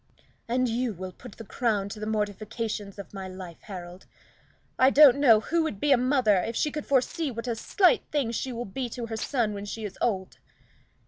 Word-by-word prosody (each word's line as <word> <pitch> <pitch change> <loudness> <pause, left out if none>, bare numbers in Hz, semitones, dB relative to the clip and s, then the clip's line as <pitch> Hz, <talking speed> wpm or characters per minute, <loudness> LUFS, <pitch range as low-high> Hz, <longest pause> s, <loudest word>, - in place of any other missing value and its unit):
"And 250 +2 +1
you 235 0 -1
will 185 +1 -6
put 190 - -12
the 225 - -10
crown 215 -3 -1
to 210 - -7
the 215 - -4
mortifications 215 -1 -3
of 200 - -9
my 190 -1 -6
life, 185 -3 -9
Harold. 180 -2 -9 0.7
I 260 - +7
don't 280 -2 +7
know 235 -7 +6
who 335 +8 0
would 315 -11 -3
be 295 - +1
a - - +8
mother 250 -5 +3
if 225 +6 -2
she 300 - 0
could 300 0 -5
foresee 280 +4 +1
what 230 -1 -6
a 235 - -1
slight 360 - +3
thing 280 -6 0
she 255 +3 -3
will 240 0 -4
be 245 +5 -4
to 235 0 -5
her 225 -1 -5
son 230 -3 0
when 200 0 -6
she 215 +1 -5
is 195 - -8
old." 190 -5 -1
225 Hz, 210 wpm, -27 LUFS, 200-255 Hz, 0.7 s, a